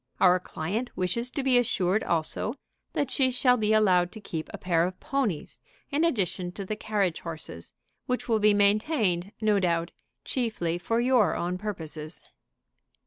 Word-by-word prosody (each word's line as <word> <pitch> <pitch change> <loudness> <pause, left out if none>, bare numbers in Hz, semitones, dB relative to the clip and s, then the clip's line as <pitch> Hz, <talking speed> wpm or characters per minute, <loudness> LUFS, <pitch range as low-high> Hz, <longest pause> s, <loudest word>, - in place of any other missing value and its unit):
Our 180 -1 +5
client 195 +8 -3
wishes 185 +7 0
to 275 - -3
be 255 -2 +5
assured 195 -3 +1
also 165 - -1 0.4
that 280 -3 -1
she 265 -2 +3
shall 250 0 +3
be 215 -3 0
allowed 185 -5 +4
to 220 - -8
keep 165 -6 -5
a - - -6
pair 170 -2 +1
of 180 +1 -3
ponies 250 - -2 0.3
in 290 +3 +1
addition 190 - 0
to 195 - -6
the 215 - -3
carriage 205 -5 -1
horses, 160 - -7 0.4
which 250 0 -2
will 225 -2 +2
be 210 0 +4
maintained, 205 - +2
no 210 -2 +3
doubt, 170 -2 0 0.3
chiefly 215 -9 -1
for 230 +5 0
your 245 -4 +3
own 180 +1 -2
purposes." 160 -6 -5
205 Hz, 160 wpm, -27 LUFS, 175-235 Hz, 0.4 s, Our